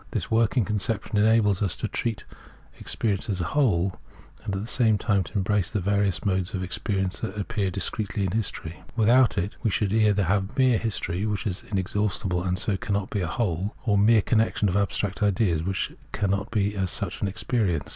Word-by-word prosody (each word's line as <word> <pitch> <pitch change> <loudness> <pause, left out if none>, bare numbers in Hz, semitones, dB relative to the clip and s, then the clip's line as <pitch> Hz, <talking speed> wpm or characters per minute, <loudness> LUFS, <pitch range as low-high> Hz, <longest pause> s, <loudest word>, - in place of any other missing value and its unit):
This - - -3
working 115 0 +3
conception 105 +1 -1
enables 105 -2 +3
us 100 -4 0
to - - -3
treat 110 -3 -3 0.5
experience 105 -1 -1
as 95 -3 -1
a - - 0
whole, 95 -10 +2 0.5
and 100 - -3
at - - -2
the 105 - -5
same 115 -4 +3
time 100 -2 +1
to - - -12
embrace 100 -2 +1
the 105 - -1
various 100 -2 0
modes 95 -1 0
of 95 - -2
experience 95 0 -2
as 95 - -2
these 105 - -3
appear 100 -2 -1
discretely 100 +3 -2
in 95 - -1
history. 95 -6 -3 0.2
Without 120 +2 +4
it, 100 +2 -2
we 115 - +1
should 100 0 0
either 105 -2 +3
have 95 - 0
mere 130 -4 +4
history, 105 -3 -2
which 105 +1 -2
is 95 -3 -2
inexhaustible 95 -1 -1
and 90 0 -1
so 95 +1 -1
cannot 100 0 -2
be 100 - -1
a 90 - -1
whole, 100 -1 -2
or 105 -3 +3
mere 105 +1 +5
connection 110 -2 +2
of 90 - -1
abstract 100 0 -1
ideas, 100 -5 +2
which 95 +2 -2 0.2
cannot 100 -1 0
as 100 -2 0
such 95 +1 -3
be 100 - +1
experience. 95 - -1
100 Hz, 195 wpm, -26 LUFS, 95-110 Hz, 0.5 s, mere